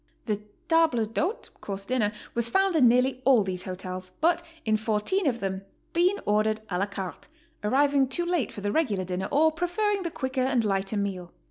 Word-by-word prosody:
The 210 -2 -1 0.3
table 320 -9 +3
d'hote 315 - -2
(course 195 -1 -5
'dinner) 225 -3 +1 0.2
was 235 0 0
found 385 +6 +2
in 270 -6 +6
nearly 250 +2 +3
all 255 -5 +5
those 185 -1 -4
hotels, 185 0 -6
but 340 +2 +3 0.2
in 220 -1 +3
14 220 - 0
of 235 -3 0
them 190 -1 -2 0.3
Bean 360 +4 +3
ordered 215 +1 +2
a 180 - 0
la 200 - +1
carte, 195 -2 -6 0.4
arriving 275 +4 +3
too 345 +7 -1
late 345 -7 0
for 205 - -8
the 205 0 -1
regular 215 -12 +1
dinner 185 +1 -3
or 315 +3 +4
preferring 385 +5 0
the 345 - -2
quicker 260 -4 -2
and 255 -3 +2
lighter 195 +1 0
meal. 185 -3 -3
235 Hz, 190 wpm, -27 LUFS, 200-315 Hz, 0.4 s, in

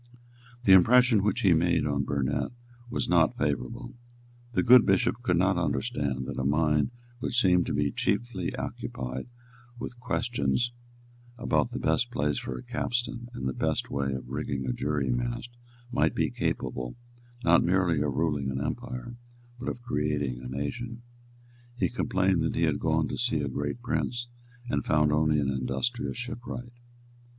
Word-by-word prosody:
The 95 - +7
impression 120 +4 +6
which 105 0 +1
he 95 -4 +5
made 85 +1 +2
on 70 -2 0
Burnet 70 0 -1 0.4
was - - -2
not - - +3
favourable. 60 - -2 0.6
The - - +2
good 125 0 +8
bishop - - +2
could - - +1
not - - +3
understand 70 -3 -1
that - - -4
a - - -1
mind 75 +1 +2 0.3
which 125 -1 0
seemed 90 -2 +4
to - - -1
be 70 -1 +1
chiefly 100 - -1
occupied 65 0 -5 0.5
with 120 0 -7
questions 120 - 0 0.7
about 120 -1 +1
the 125 - -5
best 125 -1 +1
place 75 - 0
for 65 - -5
a - - -8
capstan 120 0 -2
and 65 - -3
the 65 - -1
best - - -1
way 70 -1 0
of 65 -2 -5
rigging 70 -1 -2
a 65 - 0
jury 70 +1 -1
mast - - -2 0.4
might 120 - +2
be - - +1
capable, 60 -1 -2 0.5
not 85 0 +5
merely 90 -4 +2
of 75 -3 0
ruling 75 -4 0
an 65 0 -2
empire, 120 - -4 0.4
but 130 - -3
of 120 - -6
creating 75 - -1
a 65 - -7
nation. 115 - -4 0.7
He - - +1
complained 95 -7 +1
that 80 - 0
he 85 - +1
had 75 -3 +2
gone 80 -1 +1
to - - -4
see 120 -11 +1
a - - -1
great 70 - -3
prince, 120 -1 -1 0.4
and - - +1
had - - -4
found 75 0 +4
only 75 0 +3
an 70 -1 +1
industrious 120 - -2
shipwright. 120 0 -6
80 Hz, 165 wpm, -28 LUFS, -, 0.7 s, good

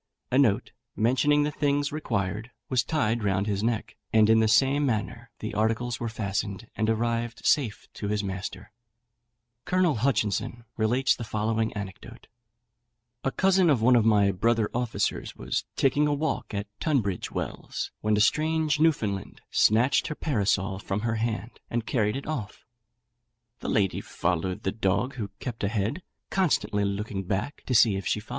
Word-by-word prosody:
A 130 - +4
note, 110 -8 +2 0.2
mentioning 140 +6 +3
the 150 - 0
things 145 -1 0
required, 110 - -2 0.2
was 125 -4 +2
tied 115 -7 0
round 95 -1 +1
his 100 -2 -1
neck, 115 0 -2
and 110 0 +5
in 110 - +6
the 110 - +3
same 135 +6 +4
manner 120 -1 -2
the 110 - -5
articles 115 +3 0
were 115 - -2
fastened, 100 -1 -3
and 110 0 0
arrived 115 +1 -1
safe 130 -8 +1
to 105 - -5
his 105 0 0
master. 95 +2 -5 0.9
Colonel 180 -7 +2
Hutchinson 115 -1 0
relates 120 +4 +2
the 120 - -6
following 110 0 -1
anecdote: 100 -2 -8 1.0
"A - - +2
cousin 190 0 +3
of 125 -7 +3
one 125 +1 +6
of 115 - +5
my 105 -3 +4
brother 110 +3 +1
officers 120 -1 -1
was - - -2
taking 145 +2 +3
a 145 - +2
walk 155 +2 -2
at 100 -1 -3
Tunbridge 115 - 0
Wells, - - -4
when 105 0 +2
a - - +3
strange 155 +3 +2
Newfoundland 110 -12 0
snatched 115 +5 +3
her 155 - -4
parasol 100 -9 0
from 100 -1 -3
her 115 0 -1
hand, 110 -1 -3
and 115 -1 -2
carried 105 -4 +1
it 135 - -5
off. 130 -10 -5
115 Hz, 130 wpm, -27 LUFS, 105-135 Hz, 1.0 s, in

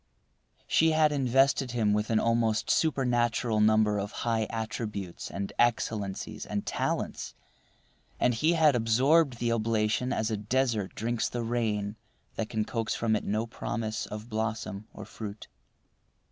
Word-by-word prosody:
She 160 0 +3
had 155 -1 +4
invested 135 -1 +2
him 110 -4 +2
with 105 +1 0
an 110 -1 +3
almost 115 -1 +1
supernatural 120 -6 +1
number 105 -1 +4
of 100 +1 -4
high 110 -2 +1
attributes 110 -5 -4
and 100 0 -5
excellencies 110 -4 0
and 105 -1 -3
talents, - - -2 0.8
and 125 - +3
he 155 +9 +2
had 155 -5 +4
absorbed 130 +5 +3
the 120 0 0
oblation 115 +2 +1
as 110 +1 0
a 110 - 0
desert 110 -2 0
drinks 115 +1 -1
the 120 -1 -3
rain 110 -3 -1 0.4
that 110 - -3
can 110 -1 -1
coax 115 -1 -2
from 110 -1 +1
it 105 - -2
no 110 +3 0
promise 110 -1 -4
of 105 +2 -7
blossom 110 -2 -3
or - - -9
fruit. 105 -1 -8
115 Hz, 145 wpm, -29 LUFS, 105-120 Hz, 0.8 s, had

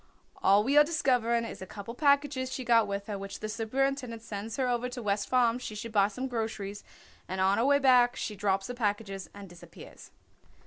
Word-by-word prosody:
"All 200 +2 +5
we 275 +5 +2
are - - +8
discovering 245 -7 +1
is - - -8
a 190 - -7
couple 205 +3 -8
packages 280 -1 +1
she 260 - -4
got 230 -2 +4
with 200 0 -4
her, 205 -2 -5
which 195 0 -7
the 215 - -4
superintendent 235 +2 -2
sends 215 0 -6
her 260 -2 +1
over 245 0 -1
to 250 0 -7
West 200 -1 -1
Farms 245 -1 +2
she 215 - -6
should 230 +2 -6
buy 200 -2 +4
some 255 +6 -5
groceries, 220 -4 -4 0.4
and 190 +1 -4
on 190 +2 +3
her 235 - +2
way 285 +1 +5
back 250 -3 +4
she 210 - -4
drops 195 -1 0
the 245 - -5
packages 205 -4 -3
and 200 -1 -9
disappears." 175 -1 -14
230 Hz, 210 wpm, -29 LUFS, 200-255 Hz, 0.4 s, are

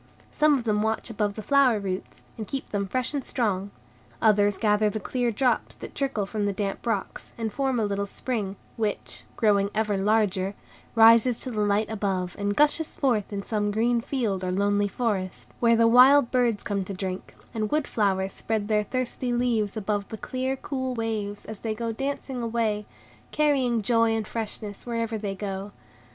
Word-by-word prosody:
Some 300 -1 +4
of 250 - -4
them 210 -2 +1
watch 220 +2 -1
above 205 -2 -1
the 215 - -6
flower 270 -1 +4
roots, 190 -2 -5
and 220 -2 -6
keep 275 - -4
them 200 -1 -1
fresh 255 +6 -1
and 280 -2 -2
strong; 205 -7 -1 0.5
others 205 -2 +3
gather 210 -1 +3
the 215 - -3
clear 245 +4 -1
drops 245 +3 0
that - - -9
trickle 265 -7 -1
from 205 0 -2
the - - +1
damp 200 +3 -3
rocks, 230 - -3
and 225 -2 -3
form 265 -3 0
a 220 - +1
little 200 0 -2
spring, 205 -3 -3 0.2
which, 215 -3 -3
growing 200 -3 +3
ever 210 -2 +1
larger, 200 -2 +1 0.4
rises 230 +1 +6
to 255 - -2
the 215 -2 -1
light 205 +1 +2
above, 195 -4 -2
and 205 0 0
gushes 300 +2 +2
forth 235 -8 +1
in 200 -1 -3
some 205 -1 -1
green 230 +3 +1
field 225 -8 -2
or 180 - -1
lonely 205 +2 +2
forest; 195 -4 -3
where 230 -1 +4
the 230 0 +5
wild 255 +3 +7
birds 240 -5 +1
come 200 -2 -1
to 195 - -5
drink, 185 0 -5 0.2
and 215 -2 -1
wood 305 -1 +1
flowers 195 -3 0
spread 220 -2 -2
their 210 -1 +3
thirsty 255 +2 -2
leaves 235 -4 0
above 205 -1 -1
the 220 - -6
clear, 260 +4 -2
cool 260 -2 -3
waves, 215 -3 -3
as 220 -2 -7
they 220 -1 -3
go 230 +1 -2
dancing 270 +1 -3
away, 225 -3 -1 0.4
carrying 265 -7 +2
joy 230 0 +3
and 220 -1 -2
freshness 215 -1 -6
wherever 230 -1 -2
they 200 -2 -3
go. 195 0 -5
220 Hz, 185 wpm, -26 LUFS, 205-240 Hz, 0.5 s, wild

